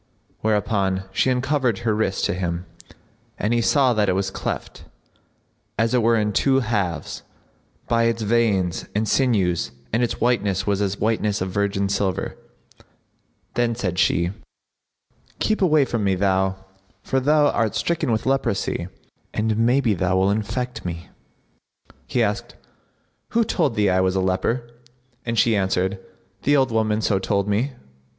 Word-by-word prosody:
Whereupon 100 -3 0
she 115 - +1
uncovered 130 -2 +1
her 110 -2 +2
wrist[FN#60] 105 -3 0
to - - 0
him, 90 -1 -3 0.7
and 105 +3 0
he 120 - +2
saw 130 +1 +3
that 105 -3 +1
it - - +3
was 95 0 -1
cleft, - - -5 0.9
as 115 +3 +1
it 125 - +3
were 115 +1 +3
in 105 -2 0
two 135 +5 +3
halves, 100 - -2 0.7
by 115 0 +2
its 115 -1 0
veins 105 -5 +1
and 110 +1 +1
sinews 100 -10 +1 0.2
and 115 - +2
its 120 - -1
whiteness 105 -6 +1
was 100 -1 0
as 100 -1 0
the - - -18
whiteness 105 -2 +1
of 95 0 -3
virgin 100 0 0
silver. 100 -2 -1 1.2
Then 120 -1 +1
said 90 -6 -2
she, 85 -1 +2 1.1
"Keep 215 - 0
away 155 -6 +4
from 115 -4 -2
me, 95 -1 +2
thou! 95 0 +1 0.5
for 135 - 0
thou 145 +2 +3
art 115 -2 0
stricken 165 -6 0
with 110 - 0
leprosy, 115 -9 0 0.5
and 110 0 +1
maybe 120 +1 +3
thou 95 0 0
wilt 95 +2 +3
infect 125 +4 -3
me." 85 -1 -6 1.0
He 120 - +1
asked, 105 -1 -2 0.8
"Who 230 0 +4
told 165 - 0
thee 105 -2 +2
I 90 - +3
was 95 0 +1
a - - +2
leper?" 95 +6 0 0.6
and 115 0 -1
she 115 +1 +4
answered, 95 0 0 0.4
"The 145 +1 +3
old 130 -3 +2
woman 110 -1 +1
so 100 -3 +1
told 100 0 0
me." 115 +7 0
105 Hz, 155 wpm, -22 LUFS, 95-120 Hz, 1.2 s, away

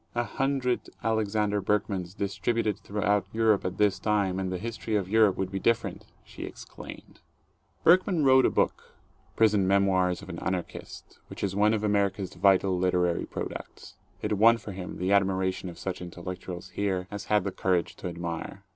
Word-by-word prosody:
"A 120 - +1
hundred 130 -1 -1
Alexander 105 -2 +1
Berkmans 95 -3 -1
distributed 105 +1 -1
throughout 100 -1 0
Europe 110 -2 +3
at 90 0 -3
this 100 -2 +2
time, 100 -3 +1
and 95 -1 -2
the 90 - -2
history 115 +1 -4
of 100 -3 0
Europe 105 -1 +4
would 95 -1 -2
be 95 - -2
different!" 115 +4 0 0.2
she - - -12
exclaimed. - - -10 0.6
Berkman 180 -1 +4
wrote 130 0 +6
a - - +2
book, - - -1 0.4
"Prison 105 -4 +3
Memoirs 95 -2 +2
of 100 - -11
an 85 - -6
Anarchist," 95 -1 -5
which - - -8
is 95 -1 -1
one 105 +2 +4
of 105 - -3
America's 100 -2 0
vital 95 +1 +3
literary 90 -1 +1
products. - - -7 0.3
It 105 - 0
won 115 +2 +7
for 110 -2 -8
him 95 -1 -7
the 90 +2 -1
admiration 95 -2 +1
of 85 - -10
such 95 -2 -4
intellectuals 90 +1 -7
here 95 -1 -2
as 105 0 -6
had 105 -2 +2
the 100 - -2
courage 90 -2 0
to - - -5
admire. 85 +2 -5
100 Hz, 170 wpm, -28 LUFS, 95-105 Hz, 0.6 s, won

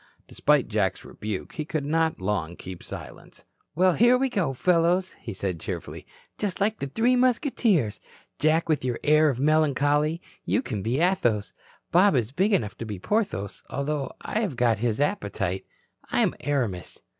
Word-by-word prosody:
Despite 150 -3 +2
Jack's 105 -4 -1
rebuke, 105 -3 -5
he 155 - -3
could 150 -1 -3
not 160 +2 +1
long 95 -3 -2
keep 90 -1 -9
silence. - - -10 0.3
"Well, 185 +2 +4
here 240 +6 +5
we 265 +1 +1
go, 195 - 0
fellows," 175 +5 +2
he - - -7
said 95 -3 -3
cheerfully, - - -6 0.3
"just 200 -3 -2
like 215 +2 +1
the 140 - -3
Three 230 - +2
Musketeers. 240 - +2 0.4
Jack 160 +2 +2
with 155 -5 +1
your 125 -2 -2
air 155 +1 +5
of 130 -3 -2
melancholy 150 +1 +2 0.2
you 255 - 0
can 105 - -4
be 120 +7 0
Athos. 160 - +1 0.4
Bob 185 0 +5
is 120 -2 0
big 190 +9 +1
enough 110 - +1
to 115 - -4
be 105 -2 -5
Porthos, 100 - -2
although 140 +1 -2
I 215 - -2
have 200 - -2
got 115 -3 +2
his 115 0 0
appetite. 100 - -1 0.4
I'm - - +2
Aramis." 120 - -2
150 Hz, 165 wpm, -26 LUFS, 110-185 Hz, 0.4 s, here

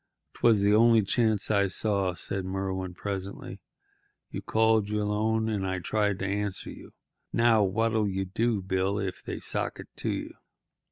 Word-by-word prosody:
"'Twas 110 -4 +3
the 100 +1 +4
only 115 0 +5
chance 110 +1 +1
I 100 -1 +3
saw," 100 -2 +1
said 95 +2 -3
Merwin 95 -1 -3
presently. 100 0 -6 0.7
"You - - -5
called 110 -2 +2
your 105 0 0
loan, 110 +2 0
and 105 -3 -1
I 95 0 -1
tried 105 +1 0
to 95 - -3
answer 100 -1 -2
you. - - -12 0.4
Now, 115 -2 +4
what'll 110 +2 +1
you 95 0 -2
do, 105 +2 0
Bill, 95 +1 0
if 95 -3 -4
they - - -5
sock - - -3
it - - -10
to - - -2
you?" - - -3
100 Hz, 165 wpm, -28 LUFS, 95-110 Hz, 0.7 s, only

